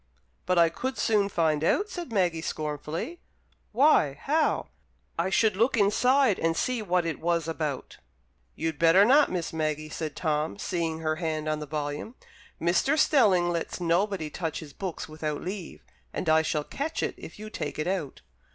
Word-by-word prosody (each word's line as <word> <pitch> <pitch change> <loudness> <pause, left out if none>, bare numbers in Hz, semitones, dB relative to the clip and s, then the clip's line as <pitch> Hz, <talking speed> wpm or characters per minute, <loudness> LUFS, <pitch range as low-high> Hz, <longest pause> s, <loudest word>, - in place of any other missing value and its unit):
"But 180 -1 +2
I 170 -1 +6
could 260 +10 -4
soon 210 -3 +2
find 160 -5 +1
out," 400 - +2
said 345 -8 -6
Maggie, 175 -6 +1
scornfully. 155 - -4 0.5
"Why, 230 - +4
how?" 310 +2 +1 0.5
"I 175 +3 +1
should 210 +1 +3
look 230 +5 +2
inside, 240 +3 +3
and 165 0 0
see 250 -2 0
what 180 -3 +1
it 165 - -3
was 170 -1 0
about." 155 -4 -4 0.6
"You'd 160 -1 -3
better 170 +4 +6
not, 280 +5 +5
Miss 175 -3 -3
Maggie," 155 -1 -2
said 155 0 -5
Tom, 150 - -1
seeing 165 -2 -2
her 155 -1 -1
hand 155 -2 -2
on 155 0 0
the 150 - -6
volume. 150 - -4 0.4
"Mr. 180 - +2
Stelling 200 - +4
lets 170 +1 -3
nobody 175 -1 0
touch 160 -1 -3
his 150 -4 -10
books 190 -4 -5
without 155 -1 -4
leave, 185 -1 -6 0.3
and - - -4
I 160 0 +5
shall 155 -1 -1
catch 300 - -3
it - - -1
if - - -11
you 215 +1 -8
take 150 - -4
it 155 - -1
out." 180 -7 -3
170 Hz, 170 wpm, -27 LUFS, 155-210 Hz, 0.6 s, I